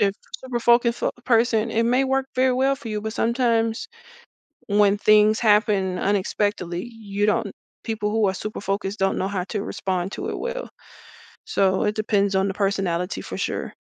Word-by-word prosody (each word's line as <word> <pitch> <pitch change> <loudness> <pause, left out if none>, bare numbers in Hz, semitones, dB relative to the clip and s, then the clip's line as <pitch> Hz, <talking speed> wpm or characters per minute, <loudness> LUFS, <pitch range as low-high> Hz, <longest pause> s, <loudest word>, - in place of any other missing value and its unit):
if 200 -1 +2
you're - - -29
a - - -29
super 240 -2 -2
focused 235 0 +3
fo - - 0
person, 230 -1 +2
it 230 +1 +1
may 250 +3 +3
work 265 0 0
very 255 0 +3
well 265 +2 +2
for 235 - -9
you, 210 -1 -3
but 220 +1 -4
sometimes 230 - 0 0.8
when 205 0 +3
things 215 +1 +4
happen 205 -4 +2
unexpectedly, 195 -2 -1
you 205 -3 -3
don't 210 - 0 0.3
people 220 -2 -2
who 220 -1 +2
are 190 - 0
super 215 +2 -6
focused 195 +1 -2
don't 195 0 +1
know 190 - -1
how 195 -3 -2
to 205 0 -3
respond 190 -3 -3
to - - -4
it - - -4
well. - - -4 0.8
So 190 -1 +1
it 210 - 0
depends 205 -2 +1
on 190 +1 +2
the 195 - -2
personality 195 -3 -1
for - - -7
sure. - - -3
210 Hz, 185 wpm, -23 LUFS, 195-230 Hz, 0.8 s, things